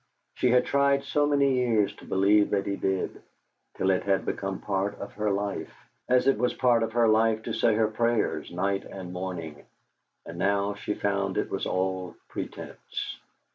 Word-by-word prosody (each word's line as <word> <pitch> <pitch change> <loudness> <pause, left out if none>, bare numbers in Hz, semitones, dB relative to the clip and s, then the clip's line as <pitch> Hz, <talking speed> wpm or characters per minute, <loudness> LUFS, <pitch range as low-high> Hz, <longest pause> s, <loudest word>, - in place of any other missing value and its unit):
She 125 - +1
had 125 +1 +4
tried 140 0 +2
so 145 +1 +1
many 140 -2 +3
years 115 -5 +2
to - - -13
believe 100 +2 +3
that 100 -1 0
he 100 - -1
did, 95 -1 -2 0.5
till 95 - +2
it 90 - +1
had 100 -1 0
become 95 -1 -3
part 100 0 -2
of 100 - -7
her 105 0 -1
life, 100 0 -2 0.4
as 125 0 +4
it 135 -5 +3
was 125 +1 +1
part 120 -2 +3
of 115 -1 -2
her 120 -1 +4
life 110 0 +3
to 115 - -4
say 110 0 +3
her 110 0 +3
prayers 115 +1 0
night 95 +3 -1
and 90 -2 -8
morning; 90 -5 -5 0.6
and 85 +1 -8
now 100 +1 +1
she 105 +1 -4
found 100 -1 -1
it - - -1
was - - -2
all 95 -1 -2
pretence. - - -6
100 Hz, 180 wpm, -27 LUFS, 95-115 Hz, 0.6 s, had